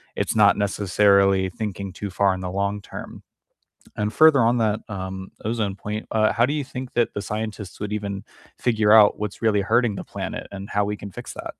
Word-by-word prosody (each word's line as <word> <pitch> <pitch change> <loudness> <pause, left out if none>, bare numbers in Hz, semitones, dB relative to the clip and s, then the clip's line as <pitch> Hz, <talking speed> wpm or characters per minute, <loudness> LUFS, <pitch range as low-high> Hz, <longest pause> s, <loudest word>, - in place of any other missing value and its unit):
it's - - -1
not 105 -2 +5
necessarily 100 -1 +3
thinking 100 -1 -5
too 100 +1 -5
far 95 +1 +2
in 95 - -5
the 90 -1 -4
long 100 +1 -1
term, - - -9 0.8
and 105 +1 -1
further 155 -4 +6
on 115 +2 +3
that, 110 -1 +1
um, 95 -2 -6
ozone 110 -3 -1
point, 105 +1 -5
uh, 110 -1 +2
how 115 +3 +2
do 135 - +1
you 150 -2 -1
think 130 -1 -7
that 120 -1 0
the 100 - -3
scientists 105 -2 -5
would 105 0 -4
even 100 -1 -4 0.3
figure 110 -3 +2
out 110 -2 +7
what's 105 -2 -5
really 110 -3 +2
hurting 115 +2 +2
the - - -5
planet - - -6
and 100 0 -8
how 105 0 +1
we 105 +1 -3
can 100 0 -9
fix - - -8
that? - - -7
105 Hz, 205 wpm, -23 LUFS, 100-110 Hz, 0.8 s, out